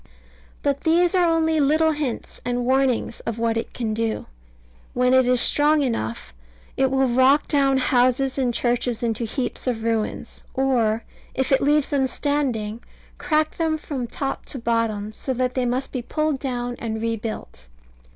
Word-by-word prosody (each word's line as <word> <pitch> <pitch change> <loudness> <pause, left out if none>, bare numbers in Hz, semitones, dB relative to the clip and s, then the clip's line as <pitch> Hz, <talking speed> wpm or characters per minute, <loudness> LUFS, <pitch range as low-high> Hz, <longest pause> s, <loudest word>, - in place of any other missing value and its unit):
But 280 -1 0
these 345 +2 +3
are 360 -2 +4
only 320 -1 +2
little 310 +3 +3
hints 290 -6 -4
and 245 0 -1
warnings 260 -1 +1
of 230 - -4
what 230 0 0
it 230 - -3
can 225 -3 -3
do. 225 0 -2 0.7
When 250 +1 +3
it 260 -1 +5
is 250 -1 +3
strong 295 +4 +3
enough, 110 - -3 0.4
it 265 0 +2
will 265 0 +2
rock 260 +4 +4
down 275 -2 +3
houses 255 +1 +2
and 250 -2 +1
churches 240 0 -1
into 230 0 -1
heaps 255 +3 -4
of 225 -3 -1
ruins, 225 -2 -2
or, 235 -4 +1 0.3
if 265 0 0
it 270 - +4
leaves 295 0 +2
them 275 -2 +2
standing, 250 -7 -1 0.4
crack 310 -1 0
them 320 -2 +1
from 275 -5 -4
top 270 +3 -4
to - - -5
bottom, 230 -3 -1
so 260 +4 -3
that 250 0 0
they 255 -2 0
must 255 +3 -2
be 255 - -3
pulled 305 +3 -1
down 245 -2 -3
and 220 -1 -3
rebuilt. 220 - -4
255 Hz, 165 wpm, -23 LUFS, 230-280 Hz, 0.7 s, it